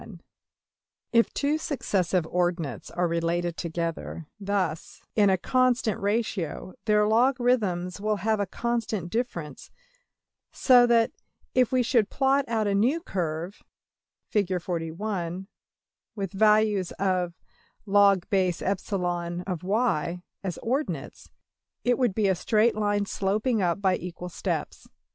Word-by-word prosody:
\Figures{167a}{167b} - - -11 0.9
If 230 0 +4
two 295 +2 +1
successive 190 - 0
ordinates 170 - -2
are 175 0 0
related 170 +1 -1
together 165 -1 -4
thus 195 -5 -2
in 205 -2 +5
a 190 - +3
constant 250 0 +1
ratio, 200 -4 -2
their 210 -1 +3
logarithms 220 -6 +1
will 215 0 +1
have 215 +1 0
a 200 - 0
constant 225 -5 -2
difference; 175 - -4 0.8
so 245 -2 +5
that, 230 -1 +3 0.4
if 255 -2 +3
we 255 -1 +3
should 230 -4 +2
plot 275 0 +2
out 225 -2 0
a 200 - +1
new 240 +11 +2
curve, 175 - -4 0.7
\Fig, 200 -4 +1
with 180 +2 -5
values 210 -2 +3
of~$\log_\epsilon 185 -1 0 0.2
y$ 180 -4 0 0.2
as 185 -4 -3
ordinates, 270 +6 -3 0.5
it 245 +1 +2
would 240 -7 +1
be 215 -3 +2
a 190 - +4
straight 215 +5 +2
line 205 -1 0
sloping 210 +4 0
up 175 0 +1
by 190 -2 +2
equal 180 0 -7
steps. 165 - -4
200 Hz, 115 wpm, -26 LUFS, 175-225 Hz, 0.9 s, in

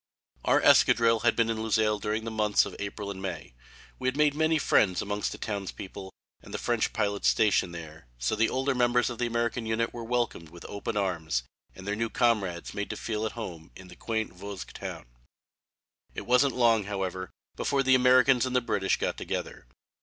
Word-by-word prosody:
Our - - +3
escadrille 115 -1 +5
had - - +2
been 115 - +2
in 110 - -3
Luxeuil 110 -1 +1
during 105 +2 -2
the 115 - -4
months 105 -1 +2
of - - -8
April 100 0 -5
and 95 -1 -8
May. 95 -9 -6 0.5
We 130 - -2
had 130 +2 0
made 150 -1 +4
many 160 +1 +2
friends 95 -10 +3
amongst 105 0 -2
the - - -6
townspeople 95 -1 -6 0.3
and - - -13
the - - -3
French 120 -2 0
pilots 100 -2 0
stationed 95 -5 +2
there, 80 -5 -10
so - - 0
the 110 +1 +2
older 135 +1 0
members 120 -2 +2
of 120 - -8
the 120 - +1
American 115 0 -1
unit 115 +1 0
were 120 - -6
welcomed 115 -8 -2
with 85 +1 -13
open 100 +1 -4
arms 80 -10 -1 0.3
and 95 - -11
their 100 +1 -1
new 115 +1 -1
comrades 105 -9 0
made 100 0 -4
to - - -4
feel 110 -1 -2
at - - -7
home 85 -8 -7
in 95 -1 -12
the 90 - -12
quaint 110 +1 -3
Vosges 100 +1 -8
town. - - -7 1.1
It - - -5
wasn't 125 +2 +3
long, 115 -4 +3
however, 95 -2 -3 0.3
before 140 -1 0
the 130 0 +4
Americans 130 0 +5
and 130 - -3
the - - +6
British 100 -5 0
got - - -2
together. - - -5
110 Hz, 200 wpm, -28 LUFS, 95-120 Hz, 1.1 s, the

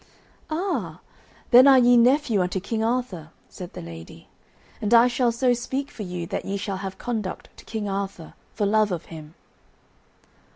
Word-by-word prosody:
"Ah, 355 +5 -3 0.5
then 255 +2 +8
are 270 -1 +8
ye 245 -1 +5
nephew 245 -3 +3
unto 180 +1 -1
King 220 +4 -3
Arthur," 225 -9 -2 0.2
said 180 -1 -10
the - - -8
lady, 80 -1 -11 0.5
"and 215 +2 +3
I 235 +1 +7
shall 245 0 +1
so 245 +2 +2
speak 265 +3 -4
for - - -10
you 180 -3 -5
that - - -4
ye 200 +1 -3
shall 195 -1 -4
have 190 0 -6
conduct 220 -6 -5
to - - -15
King 220 -2 -4
Arthur, 195 -4 -5 0.2
for 210 - 0
love 210 0 +2
of 170 -2 -4
him." 155 0 -11
215 Hz, 170 wpm, -24 LUFS, 185-245 Hz, 0.5 s, then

